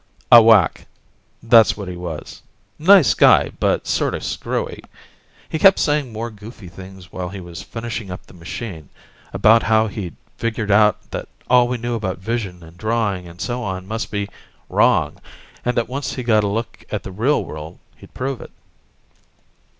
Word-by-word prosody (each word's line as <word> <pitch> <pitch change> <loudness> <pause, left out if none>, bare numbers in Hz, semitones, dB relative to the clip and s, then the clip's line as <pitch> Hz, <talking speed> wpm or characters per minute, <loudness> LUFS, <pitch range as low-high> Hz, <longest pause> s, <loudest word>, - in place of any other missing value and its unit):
A 120 - +11
wack, 110 -6 +4 0.6
that's 115 -3 +5
what 100 -3 -6
he 90 - -5
was. 85 -3 -7 0.4
Nice 180 - +6
guy, - - +5
but - - +1
sorta - - 0
screwy. - - -4 0.6
He 160 - -3
kept 195 +3 +7
saying 145 -4 0
more 115 +2 -5
goofy 105 -2 -12
things 95 0 -12
while 90 -1 -5
he 100 +1 -8
was 85 0 -9
finishing 115 0 -6
up 90 - -8
the - - -17
machine, 85 - -7 0.4
about 115 +2 +5
how 110 0 +3
he'd 100 -5 -6 0.2
figured 110 -2 -2
out 105 0 +3
that - - -5 0.2
all 125 -1 +6
we 125 0 -2
knew 120 +1 -3
about 100 -5 -3
vision 95 -3 -4
and 80 +2 -15
drawing 110 -5 -1
and 85 +1 -13
so 125 +4 -3
on 95 -4 -4
must 110 +2 -4
be 100 -1 -3 0.4
wrong, - - +2 0.4
and 125 0 -1
that 120 - +1
once 135 +3 -4
he 130 - -5
got 110 -3 +3
a - - 0
look 115 +3 -4
at 105 - -4
the 95 - -7
real 115 +10 +1
world 75 +1 -8 0.2
he'd - - -17
prove 135 0 -3
it. - - -10
110 Hz, 175 wpm, -20 LUFS, 95-120 Hz, 0.6 s, A